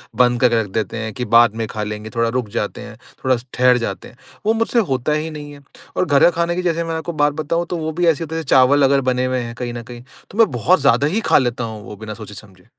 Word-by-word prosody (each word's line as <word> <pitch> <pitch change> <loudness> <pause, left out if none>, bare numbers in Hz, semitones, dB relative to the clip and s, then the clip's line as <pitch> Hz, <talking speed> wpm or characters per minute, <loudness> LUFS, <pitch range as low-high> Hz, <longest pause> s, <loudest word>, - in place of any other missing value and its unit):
बंद 120 0 +3
करके 120 -2 +4
रख 105 - -5
देते 110 +1 -2
हैं 110 -1 -4
कि 125 - -4
बाद 120 -2 +5
में 115 0 -2
खा 105 0 -4
लेंगे 105 +1 -6
थोड़ा 115 0 +1
रुक 120 -3 -2
जाते - - -3
हैं, - - -10 0.3
थोड़ा-सा 125 -2 +1
ठहर 125 0 +4
जाते 100 -6 -4
हैं। 120 - -18 0.3
वो 220 - +3
मुझसे 230 +1 +1
होता 130 +3 0
ही 155 +1 -2
नहीं 150 -1 -8
है 140 - -14 0.4
और 185 - +2
घर 145 -4 +3
का - - +8
खाने 170 +1 -1
की 180 - -1
जैसे 170 -2 0
मैं 165 -1 -3
आपको 160 +1 -4
बात 145 0 +3
बताऊँ 165 +3 -1
तो 175 - -2
वो 160 -1 -3
भी 175 - +3
ऐसे 165 0 +2
होता 160 0 -6
है 165 - -2
चावल 135 +2 +5
अगर 135 0 +4
बने 125 0 0
हुए 130 0 0
हैं 115 -1 -6
कहीं 120 -1 -5
न 120 0 -6
कहीं 120 0 -10 0.3
तो 205 - -10
मैं 225 -5 +5
बहुत 155 +9 +2
ज़्यादा 140 +1 +3
ही 200 +9 -1
खा - - +7
लेता 120 -2 0
हूँ 110 -2 -6
वो - - -9
बिना 110 +1 -7
सोचे 105 -1 -10
समझे। 95 -3 -15
125 Hz, 280 wpm, -19 LUFS, 115-160 Hz, 0.4 s, का